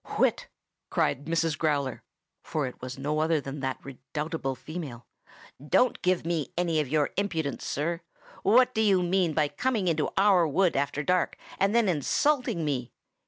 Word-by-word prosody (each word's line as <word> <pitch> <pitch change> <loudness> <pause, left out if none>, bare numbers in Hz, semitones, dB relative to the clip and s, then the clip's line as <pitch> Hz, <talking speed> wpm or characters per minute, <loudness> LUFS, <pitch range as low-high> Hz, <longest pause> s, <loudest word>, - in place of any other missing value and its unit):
"Whit!" - - +2 0.4
cried 140 - 0
Mrs. 165 -1 +1
Growler 145 -5 -1 0.4
(for 155 -3 -2
it 125 - -8
was 130 +1 -6
no 150 +3 -1
other 160 0 +2
than 140 +1 -6
that 130 -1 -2
redoubtable 135 +2 -4
female). 135 -3 -7 0.6
"Don't 245 +11 +2
give 180 -2 +1
me 165 -5 -1
any 170 -3 +1
of 150 - 0
your 150 +1 +1
impudence, 165 -8 -2
sir! 165 +4 -2 0.4
What 250 +6 +5
do 220 - +1
you 195 -4 +4
mean 175 -2 +1
by 150 -2 +3
coming 230 - -1
into 155 -3 +1
our 190 -4 +5
wood 180 +4 +2
after 140 +1 -1
dark, 180 +3 +1 0.2
and 195 +3 +2
then 235 -3 +4
insulting 210 - +1
me? 130 -5 -2
160 Hz, 165 wpm, -28 LUFS, 145-185 Hz, 0.6 s, What